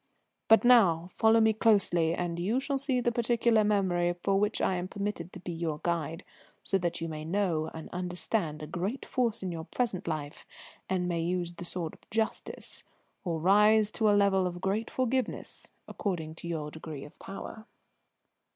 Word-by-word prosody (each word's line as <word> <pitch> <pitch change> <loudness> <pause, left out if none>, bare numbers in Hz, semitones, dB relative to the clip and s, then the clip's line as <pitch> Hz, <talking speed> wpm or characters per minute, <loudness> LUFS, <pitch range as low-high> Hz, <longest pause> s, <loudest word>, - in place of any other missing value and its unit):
"But 225 - +6
now 185 -9 +5
follow 220 +3 +4
me 220 0 +4
closely, 190 -7 +3
and 175 -1 -3
you 210 +9 +1
shall 275 0 -1
see 265 -2 +1
the 240 - +1
particular 235 -1 +3
memory 180 -4 +1
for 195 -1 +2
which 210 +2 +1
I - - +2
am 175 +1 -3
permitted 200 -3 -4
to - - -9
be 180 0 -6
your 165 -2 -3
guide, 165 0 -2 0.4
so 195 - +1
that 170 -1 -2
you 165 - -2
may 155 -1 -5
know 165 -2 0
and 160 - -7
understand 175 -3 -2
a - - -3
great 185 - -3
force 235 -5 -1
in 185 - -2
your 165 -1 -5
present 215 -5 -2
life, 150 -2 -4 0.5
and 185 -1 0
may 170 -2 -1
use 175 0 -1
the 175 - -8
sword 170 -2 -3
of - - -19
justice, 220 0 -2 0.4
or 170 -4 -2
rise 210 +4 +5
to 220 - -1
the 210 - +6
level 195 -2 +3
of 175 - -4
a - - -7
great 200 +5 -1
forgiveness, 255 0 -2 0.2
according 165 -6 -3
to 170 +1 -9
your 155 -3 -3
degree 155 -3 -7
of 145 - -14
power." 220 +3 -8
185 Hz, 185 wpm, -30 LUFS, 170-220 Hz, 0.5 s, But